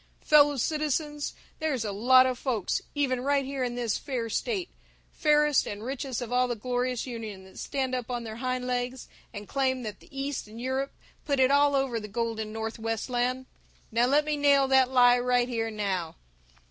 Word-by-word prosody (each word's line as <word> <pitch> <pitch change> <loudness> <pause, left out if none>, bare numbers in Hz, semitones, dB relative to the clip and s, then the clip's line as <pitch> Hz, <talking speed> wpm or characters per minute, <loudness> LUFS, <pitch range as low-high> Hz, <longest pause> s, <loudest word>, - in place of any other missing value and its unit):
"Fellow 290 -1 +6
citizens, 295 +1 -1 0.2
there's 285 -8 -1
a 205 - -2
lot 255 +6 +6
of 255 -1 -1
folks, 230 -8 -1
even 260 -4 0
right 280 +1 +1
here 270 -1 -3
in 245 -1 -2
this 235 -3 -1
fair 240 -5 -3
state, 390 - -1 0.5
fairest 300 -2 +3
and 205 +1 -6
richest 260 -1 -3
of 245 0 -6
all 250 0 +3
the 240 - -2
glorious 250 +2 -2
union, 220 -6 -7
that 190 - -13
stand 265 -2 -2
up 250 -2 -3
on 240 -1 -3
their 220 -1 -7
hind 255 0 -2
legs 250 0 -3 0.2
and 205 -2 -8
claim 260 -2 0
that 210 -3 -6
the - - -19
East 275 -3 -4
and 220 +2 -11
Europe 260 +2 -2 0.3
put 280 -3 0
it 260 +1 +5
all 285 0 +4
over 265 -4 0
the 210 - -7
golden 220 0 -3
Northwestland. 225 +3 -2 0.5
Now 235 +2 +3
let 295 +3 +3
me 300 -1 -1
nail 280 -1 +4
that 265 -1 +5
lie 245 -1 +5
right 245 0 +2
here 230 -2 -1
and 220 -1 -7
now. 185 -6 -2
250 Hz, 190 wpm, -28 LUFS, 230-275 Hz, 0.5 s, Fellow